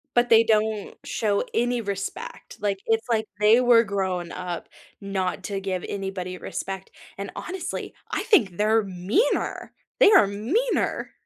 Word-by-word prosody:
But 240 0 +3
they 225 0 +7
don't 215 -1 0
show 205 -1 0
any 245 +1 +1
respect. 200 - -6
Like, 200 -2 -1
it's 225 +1 +1
like 220 -1 +1
they 215 +4 +6
were 240 -2 +6
grown 190 -4 -2
up 180 -2 -5 0.3
not 195 -2 -2
to 195 -1 -3
give 185 -2 -3
anybody 190 -2 -4
respect, 190 +1 -6 0.3
and 200 0 -5
honestly, 370 0 -5 0.2
I - - -1
think 205 - +3
they're 220 +1 +3
meaner. 195 - -1 0.3
They 420 - +7
are 385 - +7
meaner. 265 - -1
205 Hz, 145 wpm, -25 LUFS, 190-230 Hz, 0.3 s, they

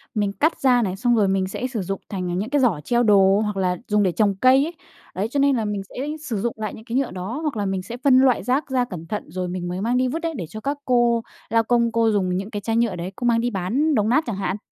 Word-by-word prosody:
mình 205 -1 0
cắt 315 +8 0
ra 250 -2 +4
này, 190 -4 -1
xong 240 +3 +2
rồi 210 -3 +3
mình 190 -1 +1
sẽ 245 +6 -3
sử 235 -5 -4
dụng 195 +1 -4
thành 180 -3 -3
những 205 +4 -2
cái 285 0 +2
giỏ 215 - +2
treo 240 +5 +2
đồ 200 -2 +5
hoặc 210 -2 -3
là 180 -2 0
dùng 210 0 +2
để 185 - +2
trồng 200 +3 +1
cây 255 +6 +5
ấy, 330 - -6 0.4
đấy, 195 +3 -1
cho 285 - 0
nên 280 -1 +4
là 225 -3 -1
mình 205 -1 -2
sẽ - - -15 0.3
sử 270 -8 -3
dụng 235 +1 -1
lại 215 -1 -4
những 220 - -12
cái 240 0 -2
nhựa 270 -1 0
đó. 190 +9 -5
Hoặc 300 -7 -2
là 205 - -1
mình 190 -1 -1
sẽ 230 +6 -8
phân 260 0 +4
loại 260 -2 +3
rác 265 +3 0
ra 255 -2 +1
cẩn 175 -8 -8
thận 210 +4 -3
rồi 180 0 -3
mình 175 0 -4
mới 180 +2 -4
mang 240 +3 +1
đi 255 - +2
vứt 310 +6 -2
đấy, 330 -1 -2
để 170 -6 -5
cho 215 - -8
các 280 +5 -2
cô 240 -2 +2 0.3
lao 225 +1 +3
công 235 0 +2
cô 230 -1 +2
dùng 185 -3 0
những 195 +3 -4
cái 205 -2 -5
chai 225 +2 -1
nhựa 230 -5 +1
đấy, 175 +2 -5
cô 245 - -5
mang 235 -1 +3
đi 245 - 0
bán 240 - 0
đồng 215 -1 +2
nát 290 +7 +3
chẳng 225 - -2
hạn. 195 0 -2
220 Hz, 300 wpm, -22 LUFS, 195-250 Hz, 0.4 s, đồ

